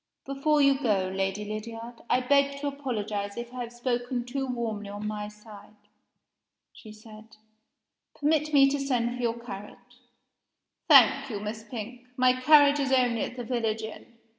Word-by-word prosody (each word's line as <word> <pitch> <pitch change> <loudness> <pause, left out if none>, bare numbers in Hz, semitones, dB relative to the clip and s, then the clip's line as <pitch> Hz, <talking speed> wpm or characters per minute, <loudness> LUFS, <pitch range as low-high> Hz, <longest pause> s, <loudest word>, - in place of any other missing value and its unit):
"Before 285 +2 +1
you 275 -1 +4
go, 195 -7 0
Lady 195 +2 -2
Lydiard, 225 +3 -7
I 255 - +3
beg 280 +2 +2
to 290 - -5
apologize 215 -8 -3
if 240 +1 -6
I 250 - -5
have 235 -1 -6
spoken 245 0 -2
too 270 +2 -3
warmly 225 -5 -4
on 205 +1 -6
my 210 -1 -4
side," 210 0 -14 1.0
she 215 - -13
said. 215 0 -14 0.8
"Permit 305 0 +1
me 275 -2 +6
to 285 - -1
send 245 -3 0
for 250 - -6
your 235 -1 -1
carriage." 210 -3 -9 1.1
"Thank 275 0 +6
you, 210 -4 -4
Miss 215 +1 -6
Pink. 245 +1 -8
My 255 0 +5
carriage 290 +2 +5
is 275 -1 0
only 245 -4 +2
at - - -4
the 245 - -5
village 225 -2 -2
inn. 220 - -8
240 Hz, 165 wpm, -27 LUFS, 215-270 Hz, 1.1 s, me